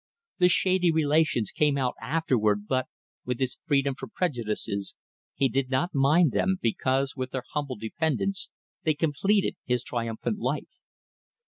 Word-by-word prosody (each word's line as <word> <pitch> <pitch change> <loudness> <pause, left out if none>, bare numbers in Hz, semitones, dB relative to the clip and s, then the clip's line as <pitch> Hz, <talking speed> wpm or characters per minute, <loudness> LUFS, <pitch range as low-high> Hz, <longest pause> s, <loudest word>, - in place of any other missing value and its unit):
The 180 - +6
shady 180 0 +3
relations 155 - +2
came 150 -2 +2
out 130 -2 0
afterward, 115 -7 +1
but 130 -1 0 0.4
with 125 -1 -2
his 130 -2 -1
freedom 140 -2 +2
from 130 -1 -8
prejudices 110 - -2 0.4
he 135 - +3
did 130 +1 -1
not 140 +7 0
mind 145 +3 +4
them, 190 +8 +1
because, 130 +3 0
with 130 -1 -3
their 130 -1 -4
humble 145 -3 -2
dependence, 160 - -1 0.3
they 155 -2 +2
completed 165 +7 +1
his 125 -1 0
triumphant 115 - -3
life. - - -3
135 Hz, 140 wpm, -27 LUFS, 125-160 Hz, 0.4 s, The